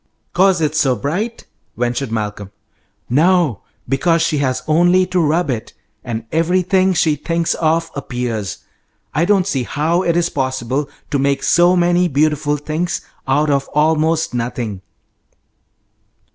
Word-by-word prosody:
"'Cause 185 -1 +3
it's 155 0 +1
so 135 -5 +2
bright?" 185 - -3 0.3
ventured 120 +1 -1
Malcolm. 105 -3 -4 0.6
"No; 160 - +2 0.3
because 165 +6 +2
she 160 -3 0
has 130 -2 -1
only 175 +4 +4
to 180 0 -1
rub 160 -1 +1
it, 115 -3 -5 0.3
and 115 -2 -5
everything 185 +3 +2
she 155 -2 +2
thinks 165 +3 -1
of 165 0 0
appears. 120 - -4 0.5
I 160 +5 +2
don't 195 -1 +3
see 140 -9 -1
how 155 +8 0
it 170 -2 +1
is 175 0 +1
possible 130 +1 -2 0.2
to 140 - +1
make 140 0 0
so 175 +1 +4
many 175 0 +3
beautiful 150 0 +1
things 155 +4 -3 0.3
out 145 +3 +2
of 140 -1 0
almost 160 +1 +2
nothing." 115 -4 -3
155 Hz, 135 wpm, -18 LUFS, 130-175 Hz, 0.6 s, only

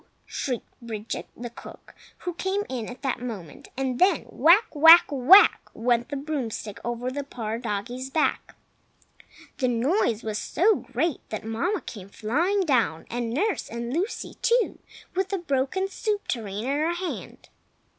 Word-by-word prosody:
shrieked 250 -4 -4
Bridget, 225 -2 -5
the 240 0 -6
cook, - - -13 0.3
who 355 - -3
came 380 +4 -1
in 240 -4 -4
at 250 +3 -10
that 265 -3 -1
moment; 200 -11 -7
and 260 -2 -1
then—whack! 360 - +4
whack! 325 +3 +9
whack! 310 - +6
went 240 +2 +1
the 285 - -3
broomstick 265 -8 -4
over 240 +1 -3
the 285 +2 -3
poor 230 -4 -5
doggie's 245 +3 -4
back. 305 +3 0 1.0
The 255 - +2
noise 240 - +1
was 215 -1 -2
so 420 +6 +3
great 330 -4 -2
that 215 0 -5
Mamma 330 - -1
came 200 -4 -9
flying 325 - 0
down, 240 - +1
and 240 0 -2
nurse 365 - -1
and 235 +1 -4
Lucy, 370 +9 -3
too, 475 0 +2 0.3
with 380 +1 0
the 395 - -1
broken 320 +3 -1
soup 415 +1 -3
tureen 210 -3 -3
in 275 +4 0
her 330 +3 +1
hand. 360 0 -6
260 Hz, 150 wpm, -26 LUFS, 230-345 Hz, 1.0 s, whack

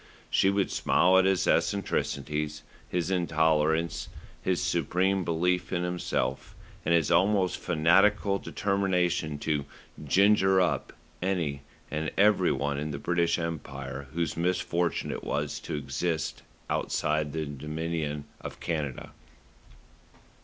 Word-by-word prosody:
She 95 - +4
would 100 0 +1
smile 95 +1 +4
at 95 - +3
his 95 -1 +2
eccentricities, 75 -6 0 0.3
his 90 0 -1
intolerance, 80 -2 +1 0.3
his 90 -2 0
supreme 90 +2 +1
belief 90 +2 0
in 90 -1 0
himself, 85 -7 -2 0.3
and 85 - +3
his 80 -2 +2
almost 95 +2 +3
fanatical 100 +5 +3
determination 90 -6 0
to 75 -1 -1 0.4
"ginger 95 +4 +4
up" 90 - 0 0.3
any 85 -7 -1 0.3
and 80 0 -1
every 100 -2 +4
one 70 +1 -1
in 75 +1 -3
the 70 - -4
British 85 +2 +1
Empire 70 -5 -5
whose 85 0 -1
misfortune 90 -1 0
it - - -5
was 75 0 -2
to - - -5
exist 75 +3 -2 0.3
outside 75 -1 0
the 80 +1 -2
Dominion 75 +1 -4
of - - -8
Canada. 75 -6 -3
85 Hz, 115 wpm, -28 LUFS, 75-90 Hz, 0.4 s, She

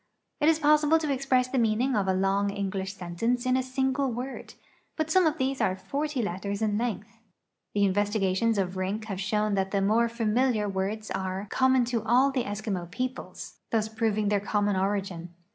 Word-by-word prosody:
It 300 - +4
is 325 - +4
possible 300 +1 +4
to 305 -3 -1
express 260 -1 +1
the 255 0 0
meaning 235 +3 +1
of 200 -2 +1
a 190 - +3
long 195 +1 +1
English 195 -1 -3
sentence 210 +8 -2
in 255 0 +2
a 260 - +2
single 265 +1 0
word, 250 +3 -6 0.4
but 315 0 -2
some 370 0 +5
of 315 0 0
these 265 +1 -1
are 185 - +2
forty 285 +4 -3
letters 200 +2 -3
in 210 -1 +1
length. 225 -1 -4 0.6
The 205 -1 +4
investigations 205 +2 +1
of 185 -1 -1
Rink 195 +4 -2
have 195 -3 -4
shown 210 +2 0
that 195 -1 0
the 200 - 0
more 220 +4 +2
familiar 230 -1 +1
words 200 +3 -3
are 190 +1 -3
common 260 -1 +3
to 235 -1 -1
all 250 +5 +4
the 255 -3 -1
Eskimo 200 -4 -4
peoples, 255 +7 -5
thus 220 -1 0
prov 220 -1 -1
ing 210 -1 +1
their 205 -1 +2
common 205 0 0
origin. 190 -3 -2
215 Hz, 190 wpm, -27 LUFS, 195-255 Hz, 0.6 s, some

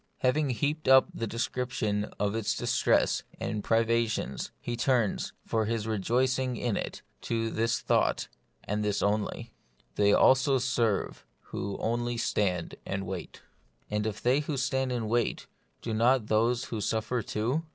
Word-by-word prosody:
Having 140 +3 +2
heaped 145 +5 -1
up 130 0 +7
the 115 - -3
description 115 -2 -1
of 100 0 +1
its 110 -2 -1
distresses - - +2 0.2
and 105 -2 -3
privations, 115 0 +1
he 120 - -4
turns, 120 -3 +1
for 110 -1 0
his 110 -1 -1
rejoicing 125 +4 0
in 120 -3 -1
it, - - -4 0.2
to 115 -1 -1
this 115 +2 0
thought, - - +1 0.4
and 105 +1 -2
this 105 -1 0
only: 105 +1 -1
— - - -39
" - - -41
They 100 0 +4
also 130 +4 +5
serve 120 -5 0 0.3
who 100 0 -3
only 120 +1 -1
stand 90 -6 0
and 95 0 -3
wait" 90 -1 -7 0.5
And 105 +1 0
if 105 -1 -5
they 125 +3 +4
who 150 -1 -3
stand 130 0 0
and 120 -3 -2
wait, 120 +1 0 0.4
do 115 - -2
not 120 +2 +3
those 115 +3 +2
who 110 - -2
suffer 110 +4 -1
too 115 +8 -1
115 Hz, 155 wpm, -29 LUFS, 105-125 Hz, 0.5 s, up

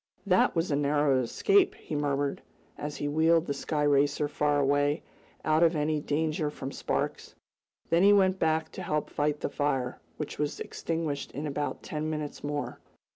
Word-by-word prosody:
"That 185 -2 +3
was 165 0 0
a - - +3
narrow 145 -1 +2
escape!" 390 - +3
he - - -9
murmured, 145 -1 -1 0.3
as 150 0 -5
he 145 - -2
wheeled 160 +2 +3
the 140 - -1
sky 150 +2 -2
racer 145 +1 +3
far 145 0 +1
away, 145 +2 +2 0.4
out 155 +1 +3
of 170 0 +4
any 150 0 +1
danger 155 +1 0
from 135 -2 -6
sparks. - - -3 0.6
Then 170 +1 +4
he 200 +2 +7
went 190 -2 +4
back 160 0 +1
to - - -7
help 150 -4 -2
fight 150 0 0
the - - 0
fire, 140 -4 -1 0.2
which 150 - -5
was 150 -1 -1
extinguished 160 -4 -3
in 145 +3 -4
about 145 0 -3
ten 155 0 -3
minutes 150 -2 -4
more. 145 0 -3
150 Hz, 175 wpm, -29 LUFS, 145-160 Hz, 0.6 s, he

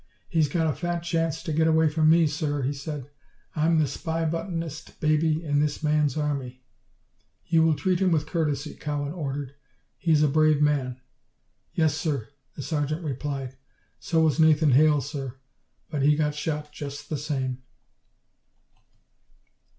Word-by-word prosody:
"He's 160 -5 +2
got 165 +2 +1
a 155 - +1
fat 175 +1 -2
chance 165 -1 -1
to 165 -4 -3
get 160 +1 +3
away 160 0 +4
from 155 0 +3
me, 165 +1 +6
sir," 145 -2 -1
he 135 +3 0
said. 145 -1 -6 0.5
"I'm 160 +1 +3
the 155 - +4
spy 165 +3 -3
bustin'est 165 -1 -4
baby 155 +1 +2
in 145 -2 +1
this 150 +1 -1
man's 150 -2 +2
army." 135 -4 -3 0.8
"You 165 -1 +3
will 160 -1 +4
treat 185 +2 0
him 190 -1 +3
with 155 -3 +1
courtesy," 150 -2 -2
Cowan 145 0 -3
ordered. 140 -5 -4 0.5
"He 170 - 0
is 155 -1 +5
a - - +5
brave 155 +1 +3
man." 140 -4 +1 0.8
"Yes, 160 -3 +3
sir," 140 -9 -2 0.3
the 140 - -6
sergeant 155 +2 -2
replied. 135 -2 -4 0.4
"So 165 -4 +1
was 155 0 +2
Nathan 155 -2 +5
Hale, 150 +2 +5
sir 135 -2 -5 0.6
but 150 -3 -1
he 150 +2 +5
got 150 -1 0
shot 150 0 -3
just 145 -1 -7
the 155 - -2
same." 130 -3 -3
150 Hz, 160 wpm, -26 LUFS, 145-160 Hz, 0.8 s, me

